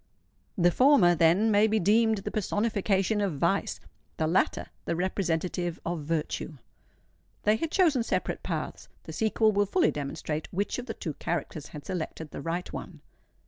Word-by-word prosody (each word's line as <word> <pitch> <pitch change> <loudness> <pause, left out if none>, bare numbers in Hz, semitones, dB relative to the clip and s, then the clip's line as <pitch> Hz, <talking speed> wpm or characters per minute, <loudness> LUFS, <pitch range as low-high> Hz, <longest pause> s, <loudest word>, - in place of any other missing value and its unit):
The 175 -1 +4
former, 250 - +5
then, 175 +7 +4
may 205 +1 +5
be 220 0 +2
deemed 220 +3 +3
the 195 - -5
personification 205 -1 0
of 190 -8 -1
vice, 170 +7 0 0.4
the 160 - +1
latter 170 +4 +1 0.2
the - - -1
representative 175 -1 -1
of 170 0 -2
virtue. 155 0 -3 0.9
They 210 +1 +4
had 330 - -2
chosen 320 -8 +3
separate 230 - -2
paths:—the - - -6
sequel 220 0 +2
will 205 0 +2
fully 355 - +3
demonstrate 150 +2 -4
which 200 +6 -1
of 250 - -7
the 225 - -4
two 155 - -4
characters 155 -1 -4
had 150 -2 -10
selected 160 -4 -5
the - - -6
right 170 +3 -3
one. - - -7
190 Hz, 155 wpm, -28 LUFS, 165-215 Hz, 0.9 s, former